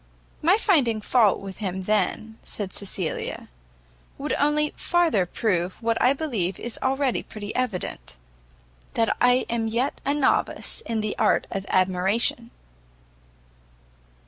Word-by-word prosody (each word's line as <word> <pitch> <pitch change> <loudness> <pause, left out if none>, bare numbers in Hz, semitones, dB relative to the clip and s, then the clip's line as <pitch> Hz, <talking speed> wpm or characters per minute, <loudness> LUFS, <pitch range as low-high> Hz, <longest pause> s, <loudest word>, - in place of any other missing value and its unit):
"My 350 +6 +5
finding 280 - +2
fault 215 -1 +3
with 195 -1 -8
him 190 -3 -3
then," 215 +2 -1
said 200 -3 -5
Cecilia, 190 -4 -3 0.7
"will 290 +2 -4
only 295 +1 +2
farther 325 - +2
prove 185 -3 -1
what 230 -1 0
I 250 - +5
believe 235 - -2
is 240 - -5
already 265 -1 +1
pretty 205 -1 -7
evident, 195 - -3 0.8
that 225 -1 +2
I 245 +1 +4
am 230 -1 -1
yet 240 +5 -1
a 280 +2 +1
novice 290 -3 0
in 225 -1 -1
the 215 -1 -2
art - - +3
of 195 +1 -4
admiration." 190 +6 +1
225 Hz, 125 wpm, -25 LUFS, 195-260 Hz, 0.8 s, My